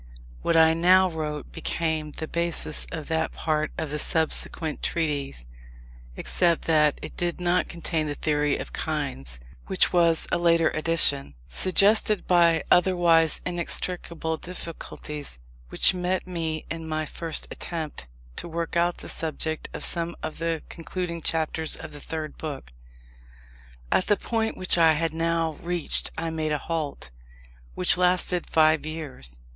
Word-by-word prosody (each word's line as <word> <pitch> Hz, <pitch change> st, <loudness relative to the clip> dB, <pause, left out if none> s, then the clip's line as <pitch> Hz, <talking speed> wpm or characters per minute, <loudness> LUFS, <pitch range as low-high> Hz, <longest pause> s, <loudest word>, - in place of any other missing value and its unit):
What 165 Hz, -, +1 dB
I 160 Hz, 0 st, +6 dB
now 185 Hz, +2 st, +4 dB
wrote 150 Hz, -2 st, -5 dB
became 160 Hz, -2 st, -2 dB
the 160 Hz, -, -5 dB
basis 170 Hz, -2 st, +1 dB
of 155 Hz, -2 st, -6 dB
that 160 Hz, 0 st, -1 dB
part 155 Hz, -1 st, -1 dB
of 160 Hz, -3 st, -4 dB
the 150 Hz, -, -2 dB
subsequent 160 Hz, 0 st, -1 dB
Treatise; 145 Hz, -, -2 dB, 0.7 s
except 170 Hz, -2 st, +1 dB
that 150 Hz, -2 st, +3 dB
it -, -, -8 dB
did 175 Hz, 0 st, -2 dB
not 180 Hz, +1 st, +1 dB
contain 165 Hz, -2 st, -2 dB
the 145 Hz, -, -3 dB
Theory 150 Hz, -1 st, 0 dB
of -, -, -8 dB
Kinds, 130 Hz, -, -4 dB, 0.3 s
which -, -, +1 dB
was 170 Hz, -2 st, +3 dB
a -, -, +1 dB
later 170 Hz, -1 st, +3 dB
addition, 155 Hz, -, +5 dB
suggested 200 Hz, -, +4 dB
by 170 Hz, -3 st, +4 dB
otherwise 175 Hz, -3 st, +5 dB
inextricable 170 Hz, -2 st, -2 dB
difficulties 155 Hz, -, -5 dB, 0.3 s
which -, -, +3 dB
met 180 Hz, 0 st, -2 dB
me 165 Hz, -3 st, -3 dB
in 165 Hz, -1 st, -5 dB
my 155 Hz, 0 st, -2 dB
first 165 Hz, +1 st, -1 dB
attempt 155 Hz, -, -5 dB, 0.3 s
to -, -, -4 dB
work 170 Hz, 0 st, -4 dB
out 170 Hz, +1 st, +1 dB
the -, -, -7 dB
subject 160 Hz, 0 st, -3 dB
of -, -, -6 dB
some 170 Hz, 0 st, -1 dB
of 155 Hz, 0 st, -5 dB
the 165 Hz, -1 st, -2 dB
concluding 170 Hz, 0 st, -5 dB
chapters 160 Hz, 0 st, 0 dB
of 155 Hz, -, -9 dB
the 145 Hz, -, -8 dB
Third 155 Hz, -1 st, -6 dB
Book. 140 Hz, -, -7 dB, 1.2 s
At 185 Hz, -, +2 dB
the 205 Hz, -, +3 dB
point 225 Hz, -1 st, -2 dB
which 185 Hz, -1 st, +2 dB
I 165 Hz, -1 st, +6 dB
had 165 Hz, +1 st, -1 dB
now 165 Hz, -1 st, -1 dB
reached 175 Hz, -2 st, +2 dB
I 165 Hz, 0 st, -2 dB
made 155 Hz, -1 st, -2 dB
a -, -, +1 dB
halt, 145 Hz, -, -4 dB, 0.6 s
which 90 Hz, -, +3 dB
lasted 180 Hz, 0 st, +2 dB
five 155 Hz, -1 st, +4 dB
years. 145 Hz, -, -6 dB
165 Hz, 145 wpm, -25 LUFS, 155-170 Hz, 1.2 s, I